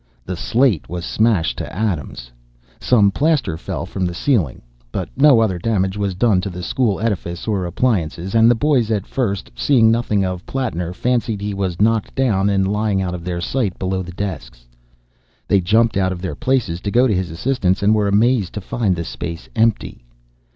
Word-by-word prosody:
The 90 - -4
slate 115 - +1
was 90 0 -4
smashed 110 -8 +1
to - - -5
atoms. 85 - -3 0.5
Some 105 -5 +3
plaster 145 - +1
fell 80 - -5
from 95 - -4
the 85 - -5
ceiling. 95 - 0 0.5
No 135 -4 +6
other 95 -5 0
damage 95 -1 0
was 100 -2 -2
done 100 -1 +2
to 100 - -4
the 90 -1 -7
school 110 +1 0
edifice 95 -6 -3
or 100 -5 0
appliances, 90 -3 -1
and 115 0 +5
the 120 - +4
boys 130 -3 +1
at 105 -3 -1
first, 105 -7 -2
seeing 115 -6 +4
nothing 110 -4 +1
of 90 0 -4
Plattner, 100 -11 -3
fancied 120 +1 -1
he 100 0 -3
was 95 -3 -3
knocked 110 0 +1
down 105 -7 +2
and 95 -1 +1
lying 105 -1 0
out 90 -2 -2
of 90 -1 -6
their 90 -1 -3
sight 105 -2 -1
below 95 0 -2
the 90 -1 -7
desks. - - -6 0.8
They 100 - +3
jumped 110 +4 +2
out 95 -1 +1
of 90 - -5
their 95 - -3
places 125 - -1
to 100 - -3
go 120 +5 +4
to 115 - +2
his 90 -2 -1
assistance, 95 +1 0
and 105 +2 +4
were 105 -2 +2
amazed 105 -1 +2
to 105 - -4
find 100 -1 -1
the 85 - -3
space 85 0 -6
empty. 115 - 0
100 Hz, 190 wpm, -19 LUFS, 90-115 Hz, 0.8 s, No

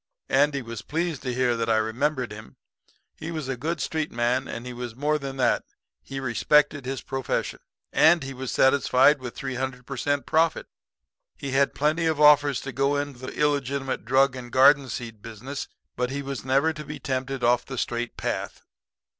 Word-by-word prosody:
"Andy 140 0 +2
was 115 -2 -7
pleased 165 -1 -2
to 125 - -3
hear 125 -1 +1
that 115 0 -2
I 110 - +4
remembered 125 +4 -1
him. 105 -11 -10 0.6
He 160 - -6
was 155 -5 -4
a 135 - -2
good 155 +6 -3
street 155 -1 -2
man; 120 +3 0
and 115 - -6
he 125 - -6
was 120 -2 -6
more 150 +3 0
than 135 -1 -6
that 130 - +2 0.4
he 135 0 -6
respected 135 +2 +2
his 135 -1 -4
profession, 135 -2 -3 0.3
and 160 0 +5
he 135 0 -6
was 130 0 -5
satisfied 140 +1 +4
with 125 -2 -7
300 130 -1 -4
per 135 - -6
cent. 145 +2 -1
profit. 160 +1 +2 0.7
He 140 - -5
had 135 +1 +2
plenty 155 +3 +1
of 160 -2 0
offers 145 -2 +5
to 135 - -6
go 140 +2 +1
into 145 -3 -3
the 130 - -7
illegitimate 140 -2 0
drug 130 +2 +3
and 120 -2 -8
garden 135 +1 +5
seed 115 -2 -6
business; 120 +6 -7 0.3
but 125 0 -1
he 140 +1 -4
was 135 -1 -5
never 135 +5 +2
to 150 -1 -7
be 150 +1 -7
tempted 135 -2 -3
off 120 +1 +4
of - - -26
the 135 - -6
straight 120 0 -3
path. - - -4
135 Hz, 190 wpm, -25 LUFS, 125-145 Hz, 0.7 s, and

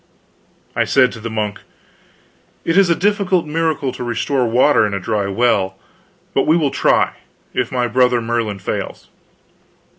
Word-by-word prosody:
I - - +2
said 130 -2 +3
to 115 - -9
the 115 +1 -5
monk: 105 -2 -3 1.1
"It 165 - +1
is 195 -2 +5
a 170 - +4
difficult 195 -3 +1
miracle 155 -3 -1
to 125 - -7
restore 120 +2 0
water 120 +1 +4
in 100 - -3
a - - -2
dry 100 +1 -1
well, 100 -3 +1 0.6
but 135 - +1
we 160 +2 +4
will 150 -5 +1
try, - - +2 0.4
if - - -1
my 125 -1 0
brother 125 +1 +3
Merlin 115 -3 -2
fails. 95 - -5
125 Hz, 155 wpm, -18 LUFS, 110-150 Hz, 1.1 s, is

